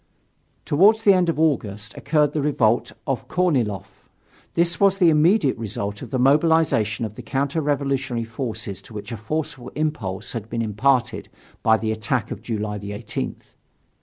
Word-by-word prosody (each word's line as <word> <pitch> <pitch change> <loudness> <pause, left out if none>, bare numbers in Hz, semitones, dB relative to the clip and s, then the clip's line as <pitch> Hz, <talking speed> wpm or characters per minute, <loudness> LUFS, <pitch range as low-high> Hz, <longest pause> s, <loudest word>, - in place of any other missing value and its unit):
Toward 195 +9 +5
the 205 -3 +6
end 180 -2 +2
of 160 - -1
August 110 -9 0
occurred 150 0 +1
the 150 - 0
revolt 120 -6 +1
of 130 -2 -2
Korniloff; 130 - -1 0.5
this 170 0 +1
was 195 -1 +4
the 175 -4 +5
immediate 155 0 +3
result 100 -2 -4
of - - -7
the 130 - -1
mobilization 135 -6 +3
of 105 - -6
the 125 - -9
counter 140 +6 -1
revolutionary 135 -4 -1
forces 115 -5 -5
to 110 - -14
which 105 +3 -7
a - - -3
forceful 140 +2 -4
impulse 145 -12 -3
had 115 -2 -5
been 115 0 -2
imparted 120 +3 0 0.3
by 110 0 +4
the 110 0 -2
attack 110 +1 -2
of - - -5
July 105 -2 -3
18th. 100 +1 -6
130 Hz, 160 wpm, -23 LUFS, 110-155 Hz, 0.5 s, the